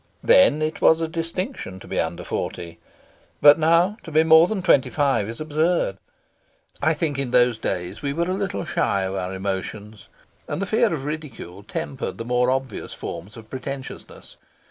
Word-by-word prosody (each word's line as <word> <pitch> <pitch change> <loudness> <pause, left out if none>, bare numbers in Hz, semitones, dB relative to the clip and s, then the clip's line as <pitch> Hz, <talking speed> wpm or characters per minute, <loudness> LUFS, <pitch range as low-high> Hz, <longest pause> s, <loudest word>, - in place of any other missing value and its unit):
Then 155 - +5
it 155 +1 -3
was 160 - +5
a 165 - -1
distinction 165 - -4
to - - -13
be - - -2
under - - -2
forty, 85 -1 -5 0.6
but 145 +2 +7
now 170 +6 +3
to - - -10
be 155 +1 +4
more 160 +1 +7
than 200 -3 -3
twenty 145 -8 +4
five 135 -8 +1
is 115 - -7
absurd. 155 - 0 0.8
I 160 +2 +2
think 150 -3 -1
in 135 -2 -2
those 120 -2 +3
days 90 0 -3
we 140 - -1
were 170 +4 -1
a 185 - 0
little 195 -2 -3
shy 100 -10 0
of 95 0 -3
our 90 -1 -3
emotions, 100 +2 -5 0.4
and - - -3
the 195 - -1
fear 220 +2 +2
of 145 -5 -3
ridicule 150 - -6
tempered 130 +5 -5
the 115 - -6
more 125 +1 +2
obvious 130 -3 -3
forms 100 +7 -7
of 110 -1 -12
pretentiousness. 135 0 -8
140 Hz, 180 wpm, -23 LUFS, 110-165 Hz, 0.8 s, but